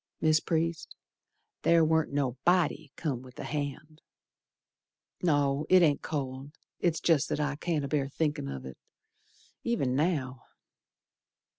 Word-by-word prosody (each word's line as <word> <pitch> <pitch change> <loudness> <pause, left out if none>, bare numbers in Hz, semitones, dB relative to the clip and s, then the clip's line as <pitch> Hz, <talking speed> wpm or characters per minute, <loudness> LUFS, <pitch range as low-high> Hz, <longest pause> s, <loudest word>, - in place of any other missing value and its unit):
Mis' 155 -1 +4
Priest, 165 0 -2 0.7
ther 165 -1 +5
warn't 160 0 +2
no 140 -3 0
body 170 -4 +2
come 140 -7 -2
with 130 -1 -14
the - - -7
hand. 150 +1 -5 1.2
No, 145 -3 +1
it 185 -1 +7
ain't 150 -3 +3
cold, 135 -1 -4 0.3
it's 165 -2 +1
jest 160 -4 +2
that - - -1
I 145 -1 0
can't 155 -1 -1
abear 140 -1 -1
thinkin' 150 - -1
of 70 -1 -6
it, 65 -1 -9 0.8
Ev'n 220 - 0
now. 135 -5 0
150 Hz, 130 wpm, -29 LUFS, 135-160 Hz, 1.2 s, it